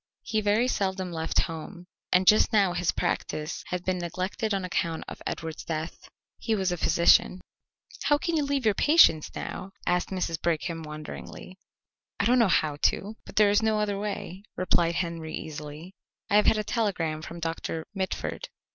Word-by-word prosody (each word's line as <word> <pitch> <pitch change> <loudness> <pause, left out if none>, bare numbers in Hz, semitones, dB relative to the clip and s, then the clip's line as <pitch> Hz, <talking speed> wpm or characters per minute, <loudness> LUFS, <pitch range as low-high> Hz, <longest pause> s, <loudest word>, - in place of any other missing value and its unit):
He 220 -1 0
very 210 +4 +2
seldom 190 -5 -1
left 160 -1 0
home, 165 +3 -6 0.3
and 185 +1 +4
just 215 +4 +6
now 200 -5 +3
his 175 0 +1
practice 155 +2 -2
had 180 -1 -4
been 185 -1 0
neglected 185 +6 -3
on 195 -2 0
account 165 -2 -1
of - - -9
Edward's 160 -1 -5
death. 160 0 -5 0.3
He 225 - 0
was 190 -3 0
a 175 - -1
physician. 170 +2 +4 0.7
"How 290 - +4
can 335 +1 -2
you 310 - +2
leave 280 -3 -1
your 215 - +4
patients 200 - +5
now?" 195 +1 -6
asked 180 0 +1
Mrs. 180 -4 -2
Brigham 165 0 -1
wonderingly. 150 - -9 0.6
"I - - +2
don't 250 +3 +4
know 230 - +5
how 155 -5 +1
to, 200 +7 +1
but - - -11
there 210 -1 +5
is 205 - +3
no 220 -1 +2
other 205 -1 -1
way," 200 -2 -5
replied 170 -2 +2
Henry 165 -3 -3
easily. 155 +3 -7 0.4
"I 205 - +6
have 210 - +4
had 220 - +5
a 215 - 0
telegram 180 -9 -1
from 170 +2 -8
Doctor 165 -1 -3
Mitford." 190 -1 -3
180 Hz, 175 wpm, -27 LUFS, 165-210 Hz, 0.7 s, just